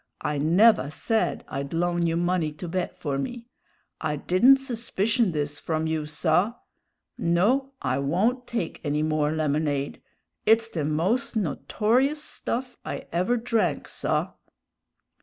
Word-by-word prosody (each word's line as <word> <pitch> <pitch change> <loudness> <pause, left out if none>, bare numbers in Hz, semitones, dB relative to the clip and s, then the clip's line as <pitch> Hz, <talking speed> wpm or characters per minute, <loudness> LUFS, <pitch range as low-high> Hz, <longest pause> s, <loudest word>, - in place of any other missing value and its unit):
I 150 -1 -1
never 175 +3 +5
said 220 +8 -1
I'd 140 +2 -5
loan 175 0 +1
you 165 0 0
money 175 -2 +1
to 165 +4 -7
bet 180 +1 -3
for 140 -3 -2
me. 235 - -5 0.6
I 155 -2 -1
didn't 205 - +5
suspicion 235 -4 0
this 150 -1 -3
from 160 -1 -1
you, 160 -1 -1
saw. 170 +8 +1 0.6
No, 235 +11 +2
I 130 0 0
won't 215 - 0
take 230 -9 -3
any 150 +1 0
more 155 -1 +1
lemonade; 150 -2 -1 0.4
it's 225 +1 +4
the 160 -8 -2
most 180 - 0
notorious 235 - +1
stuff 250 -3 -4
I - - -5
ever 185 +9 +1
drank, 230 -1 0
saw!" - - -1
175 Hz, 135 wpm, -26 LUFS, 155-230 Hz, 0.6 s, never